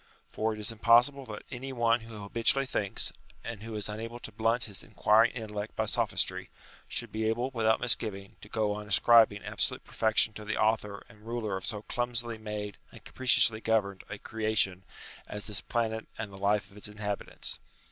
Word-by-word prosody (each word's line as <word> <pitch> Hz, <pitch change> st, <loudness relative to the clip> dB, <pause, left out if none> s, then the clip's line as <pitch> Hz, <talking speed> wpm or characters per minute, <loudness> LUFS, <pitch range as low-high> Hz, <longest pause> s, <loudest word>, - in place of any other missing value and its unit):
For 110 Hz, +1 st, 0 dB
it 110 Hz, -, -5 dB
is 105 Hz, +2 st, 0 dB
impossible 120 Hz, +5 st, +4 dB
that 105 Hz, -1 st, -7 dB
any 135 Hz, +1 st, -5 dB
one 120 Hz, -2 st, +3 dB
who 110 Hz, -2 st, -9 dB
habitually 115 Hz, +6 st, +3 dB
thinks, 100 Hz, -6 st, +1 dB, 0.3 s
and 115 Hz, -3 st, -6 dB
who 115 Hz, 0 st, -6 dB
is 105 Hz, -, -1 dB
unable 115 Hz, +3 st, -5 dB
to 115 Hz, -, -8 dB
blunt 115 Hz, +3 st, +1 dB
his 100 Hz, -4 st, -3 dB
inquiring 110 Hz, +2 st, +4 dB
intellect 105 Hz, -3 st, -5 dB
by -, -, 0 dB
sophistry, -, -, 0 dB, 0.4 s
should -, -, -3 dB
be 110 Hz, 0 st, -2 dB
able 120 Hz, +4 st, -1 dB
without 110 Hz, -3 st, +2 dB
misgiving 105 Hz, -5 st, -1 dB
to 105 Hz, -, -11 dB
go 105 Hz, -2 st, 0 dB
on 105 Hz, 0 st, -6 dB
ascribing 105 Hz, -1 st, +5 dB
absolute -, -, -1 dB
perfection 110 Hz, 0 st, +2 dB
to 105 Hz, -, -8 dB
the 110 Hz, +1 st, -2 dB
author 110 Hz, -2 st, 0 dB
and 110 Hz, -1 st, -17 dB
ruler 115 Hz, -4 st, -2 dB
of 95 Hz, -, -2 dB
so 105 Hz, -3 st, -4 dB
clumsily 120 Hz, -1 st, -2 dB
made 105 Hz, -1 st, -5 dB
and -, -, -14 dB
capriciously 115 Hz, -3 st, +4 dB
governed 100 Hz, -4 st, +1 dB
a 100 Hz, -, -5 dB
creation 110 Hz, -4 st, 0 dB, 0.5 s
as 105 Hz, 0 st, -5 dB
this 105 Hz, -2 st, -1 dB
planet 110 Hz, -2 st, -2 dB
and 110 Hz, -2 st, -5 dB
the -, -, -11 dB
life 100 Hz, 0 st, +1 dB
of 100 Hz, -, -16 dB
its 105 Hz, -, -5 dB
inhabitants. 105 Hz, -1 st, -4 dB
110 Hz, 185 wpm, -30 LUFS, 105-115 Hz, 0.5 s, ascribing